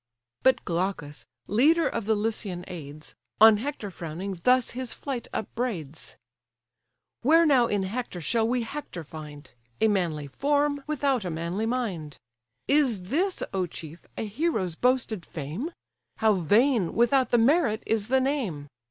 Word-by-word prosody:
But 260 Hz, -, +3 dB
Glaucus, 170 Hz, -4 st, -3 dB, 0.2 s
leader 300 Hz, -, +4 dB
of 230 Hz, -3 st, -3 dB
the 220 Hz, -, +3 dB
Lycian 205 Hz, -4 st, -3 dB
aids, 155 Hz, -3 st, -9 dB, 0.3 s
On 220 Hz, -1 st, +8 dB
Hector 230 Hz, -4 st, -4 dB
frowning, 175 Hz, +2 st, -6 dB
thus 250 Hz, -1 st, +4 dB
his 255 Hz, -1 st, -4 dB
flight 265 Hz, -4 st, -5 dB
upbraids: 195 Hz, -, -4 dB, 1.1 s
"Where 325 Hz, +6 st, +5 dB
now 260 Hz, -6 st, +5 dB
in 205 Hz, -3 st, 0 dB
Hector 205 Hz, -1 st, -4 dB
shall 225 Hz, +7 st, +1 dB
we 245 Hz, 0 st, 0 dB
Hector 225 Hz, -, -6 dB
find? 150 Hz, -1 st, -10 dB, 0.3 s
A 220 Hz, -, +4 dB
manly 170 Hz, -8 st, 0 dB
form, 285 Hz, -, 0 dB
without 275 Hz, -5 st, 0 dB
a 180 Hz, -, -3 dB
manly 170 Hz, +6 st, -2 dB
mind. 195 Hz, -, -3 dB, 0.5 s
Is 240 Hz, -11 st, +2 dB
this, 365 Hz, +6 st, 0 dB
O 185 Hz, -2 st, 0 dB
chief! 160 Hz, 0 st, -10 dB
a -, -, -2 dB
hero's 215 Hz, -, -1 dB
boasted 235 Hz, -2 st, +1 dB
fame? 165 Hz, -, -5 dB, 0.5 s
How 220 Hz, -1 st, +4 dB
vain, 205 Hz, -, +2 dB
without 250 Hz, +3 st, +3 dB
the 240 Hz, -, +4 dB
merit, 235 Hz, -2 st, +3 dB
is 220 Hz, -2 st, 0 dB
the 265 Hz, +2 st, +3 dB
name! 235 Hz, -, -2 dB
220 Hz, 145 wpm, -27 LUFS, 175-260 Hz, 1.1 s, On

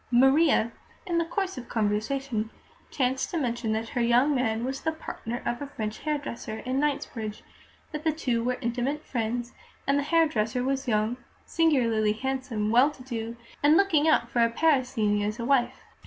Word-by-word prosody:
Maria, 265 Hz, -1 st, +4 dB, 0.3 s
in 345 Hz, -3 st, +1 dB
the 335 Hz, -, +1 dB
course 375 Hz, -2 st, -2 dB
of 240 Hz, -, -11 dB
conversation, 220 Hz, +2 st, -1 dB, 0.4 s
chanced 260 Hz, +2 st, 0 dB
to 355 Hz, -, -2 dB
mention 235 Hz, -5 st, -1 dB
that 220 Hz, +1 st, -2 dB
her 245 Hz, -, -1 dB
"young 245 Hz, +5 st, +4 dB
man" 235 Hz, -3 st, 0 dB
was 265 Hz, +1 st, -3 dB
the 320 Hz, -, 0 dB
partner 240 Hz, -6 st, -6 dB
of 240 Hz, +2 st, -2 dB
a 285 Hz, -, -4 dB
French 215 Hz, -5 st, -5 dB
hairdresser 285 Hz, -7 st, -3 dB
in 260 Hz, +1 st, 0 dB
Knightsbridge; 230 Hz, -7 st, -2 dB, 0.5 s
that 300 Hz, -1 st, -5 dB
the 320 Hz, -, +3 dB
two 250 Hz, -7 st, -1 dB
were 250 Hz, +1 st, 0 dB
intimate 250 Hz, +6 st, -2 dB
friends; 240 Hz, 0 st, -2 dB, 0.3 s
that 275 Hz, +1 st, +2 dB
the -, -, +2 dB
hairdresser 280 Hz, -7 st, +1 dB
was 270 Hz, +1 st, -1 dB
young, 220 Hz, +1 st, +1 dB, 0.3 s
singularly 235 Hz, -10 st, +2 dB
handsome, 255 Hz, -3 st, -2 dB
well 250 Hz, +5 st, +6 dB
to 275 Hz, -4 st, -12 dB
do, 230 Hz, -2 st, -5 dB, 0.2 s
and 300 Hz, +2 st, +6 dB
looking 325 Hz, -6 st, +3 dB
out 270 Hz, -7 st, +4 dB
for 235 Hz, 0 st, +2 dB
a 230 Hz, -, +4 dB
Parisienne 245 Hz, -7 st, +2 dB
as 210 Hz, +1 st, -2 dB
a 235 Hz, -, -2 dB
wife. 260 Hz, -1 st, +2 dB
250 Hz, 175 wpm, -27 LUFS, 230-285 Hz, 0.5 s, well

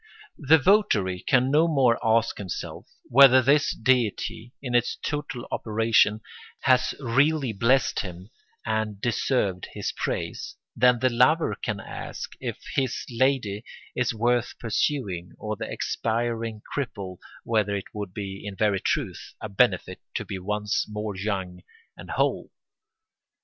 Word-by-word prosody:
The 155 Hz, +2 st, +6 dB
votary 130 Hz, -, +3 dB
can 130 Hz, +6 st, +2 dB
no 155 Hz, +3 st, +4 dB
more 135 Hz, -7 st, +3 dB
ask 115 Hz, 0 st, +2 dB
himself 95 Hz, -4 st, -6 dB, 0.2 s
whether 130 Hz, 0 st, +7 dB
his 145 Hz, +4 st, +4 dB
deity, 120 Hz, -1 st, 0 dB
in 125 Hz, -3 st, -5 dB
its 120 Hz, -1 st, +2 dB
total 145 Hz, -5 st, -4 dB
operation, 110 Hz, -1 st, +2 dB, 0.4 s
has 130 Hz, 0 st, +3 dB
really 140 Hz, +1 st, +2 dB
blessed 115 Hz, +6 st, +2 dB
him 90 Hz, +2 st, -7 dB, 0.3 s
and 110 Hz, -2 st, -1 dB
deserved 110 Hz, -5 st, 0 dB
his -, -, -3 dB
praise -, -, -3 dB, 0.2 s
than 125 Hz, +1 st, +5 dB
the 130 Hz, -, +4 dB
lover 130 Hz, +8 st, +3 dB
can 105 Hz, -5 st, -4 dB
ask -, -, -7 dB
if -, -, -4 dB, 0.2 s
his 130 Hz, -3 st, -1 dB
lady 120 Hz, -4 st, +1 dB, 0.3 s
is 125 Hz, -1 st, +1 dB
worth 120 Hz, +1 st, 0 dB
pursuing 105 Hz, -6 st, -2 dB
or 110 Hz, 0 st, -4 dB
the -, -, -6 dB
expiring 115 Hz, -1 st, -2 dB
cripple 100 Hz, -10 st, -4 dB, 0.2 s
whether 105 Hz, -3 st, +1 dB
it 100 Hz, -, -6 dB
would 105 Hz, -3 st, -5 dB
be, 95 Hz, 0 st, -6 dB
in 100 Hz, -1 st, -6 dB
very 100 Hz, -1 st, +1 dB
truth, -, -, -3 dB
a 110 Hz, -, -6 dB
benefit 100 Hz, -, +1 dB
to -, -, -2 dB
be 95 Hz, -, -5 dB
once 105 Hz, +2 st, -1 dB
more 105 Hz, -1 st, -4 dB
young 95 Hz, -2 st, -3 dB, 0.3 s
and -, -, -12 dB
whole. -, -, 0 dB
115 Hz, 135 wpm, -26 LUFS, 105-130 Hz, 0.4 s, whether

